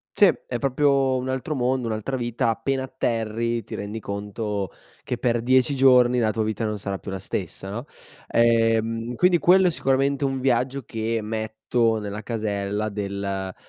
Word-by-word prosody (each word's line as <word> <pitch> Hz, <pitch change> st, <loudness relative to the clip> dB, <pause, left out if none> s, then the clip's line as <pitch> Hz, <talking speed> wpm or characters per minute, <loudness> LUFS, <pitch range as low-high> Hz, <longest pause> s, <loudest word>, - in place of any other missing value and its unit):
Sì, 205 Hz, -, +7 dB, 0.2 s
è 120 Hz, -, -3 dB
proprio 135 Hz, 0 st, +2 dB
un 130 Hz, +1 st, -2 dB
altro 130 Hz, +4 st, -2 dB
mondo, 130 Hz, -1 st, 0 dB
un'altra 110 Hz, +4 st, -2 dB
vita, 120 Hz, -1 st, 0 dB
appena 130 Hz, +4 st, -1 dB
atterri 115 Hz, -2 st, -2 dB
ti -, -, -8 dB
rendi 105 Hz, +2 st, -5 dB
conto 100 Hz, -1 st, -4 dB, 0.3 s
che 125 Hz, -, -2 dB
per 120 Hz, -1 st, +1 dB
10 130 Hz, +3 st, +3 dB
giorni 125 Hz, -2 st, +5 dB
la 110 Hz, -2 st, +2 dB
tua 110 Hz, -, -1 dB
vita 110 Hz, +1 st, -2 dB
non 105 Hz, -1 st, -3 dB
sarà 100 Hz, -1 st, -4 dB
più 100 Hz, -, -8 dB
la 95 Hz, -, -4 dB
stessa, 95 Hz, +1 st, -5 dB
no. 115 Hz, +7 st, -5 dB, 0.4 s
Ehm, 115 Hz, 0 st, +2 dB
quindi 180 Hz, +6 st, +4 dB
quello 185 Hz, +2 st, +5 dB
è -, -, +1 dB
sicuramente 140 Hz, -2 st, +1 dB
un 135 Hz, -1 st, -2 dB
viaggio 130 Hz, +1 st, +1 dB
che 115 Hz, +1 st, -2 dB
metto 110 Hz, +1 st, 0 dB
nella 105 Hz, 0 st, -5 dB
casella 105 Hz, -1 st, -2 dB
del 100 Hz, -2 st, -3 dB
115 Hz, 165 wpm, -24 LUFS, 105-130 Hz, 0.4 s, Sì